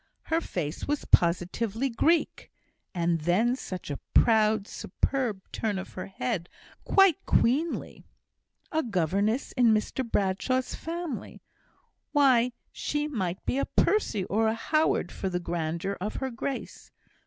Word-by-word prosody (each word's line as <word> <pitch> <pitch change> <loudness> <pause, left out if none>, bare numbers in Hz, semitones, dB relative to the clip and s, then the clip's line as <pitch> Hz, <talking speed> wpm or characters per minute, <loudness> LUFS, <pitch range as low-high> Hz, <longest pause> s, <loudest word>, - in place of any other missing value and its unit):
Her 325 +1 0
face 155 - -4
was 295 0 -1
positively 195 +8 +2
Greek; 310 +7 +1 0.4
and 170 -2 0
then 205 +10 +2
such 185 - -6
a 140 - -4 0.2
proud, 215 -2 +4
superb 235 -8 -2
turn 210 -3 -1
of 190 - -7
her 185 - -6
head; 195 -3 -3 0.4
quite 390 -5 +5
queenly! 295 +8 +1 0.7
A 315 -2 +1
governess 200 - 0
in 250 -2 +3
Mr 215 +5 -1
Bradshaw's 230 +4 0
family! 330 -5 -5 0.7
Why, 255 -4 +4 0.2
she 295 0 -2
might 190 - -3
be 265 - 0
a - - +1
Percy 245 - +1
or 220 +4 +1
a 220 - +1
Howard 300 - +1
for 190 - -3
the 180 -1 -1
grandeur 170 +2 -3
of 210 +3 -3
her 265 -1 -3
grace! 250 +3 -5
220 Hz, 130 wpm, -28 LUFS, 185-270 Hz, 0.7 s, quite